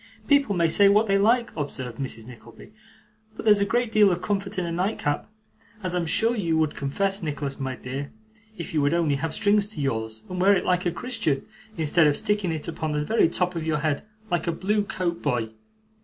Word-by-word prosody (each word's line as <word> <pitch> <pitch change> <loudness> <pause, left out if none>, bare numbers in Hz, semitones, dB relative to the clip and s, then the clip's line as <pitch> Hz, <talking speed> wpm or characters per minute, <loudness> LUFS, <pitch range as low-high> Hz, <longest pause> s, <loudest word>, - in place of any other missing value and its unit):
'People 280 -8 +3
may 170 -1 +3
say 200 +5 +5
what 210 +2 +4
they 195 -2 +2
like,' 235 +4 +2
observed 130 -6 -5
Mrs. 120 -5 -4
Nickleby, 120 - -14 0.6
'but - - -8
there's 210 -2 +6
a - - +3
great 235 +3 0
deal 210 -3 +5
of 175 - -1
comfort 200 +1 -2
in 180 - -1
a 170 - -3
nightcap, 175 -2 -2 0.5
as 185 -1 0
I'm 175 -2 -1
sure 225 +8 +4
you 170 -7 0
would 155 -2 +1
confess, 195 +8 -1
Nicholas 145 -3 -3
my 130 -1 -3
dear, 135 +3 -6 0.5
if 170 - -6
you 155 - +2
would 145 +3 +2
only 155 -5 +1
have 160 +3 -3
strings 205 -1 +3
to 210 - -10
yours, 110 -5 -2
and 180 0 -4
wear 200 +2 +5
it 180 - -1
like 180 0 +1
a - - +1
Christian, 225 - -2 0.3
instead 160 0 +3
of 145 - +2
sticking 205 -4 0
it 160 0 -4
upon 160 -2 -3
the 150 0 -1
very 220 -2 +3
top 180 +1 0
of 165 - -3
your 160 -1 0
head 150 -1 -1 0.3
like 175 0 0
a - - +2
blue 205 +5 0
coat 175 -4 -3
boy. 120 -6 -1
170 Hz, 215 wpm, -25 LUFS, 145-200 Hz, 0.6 s, there's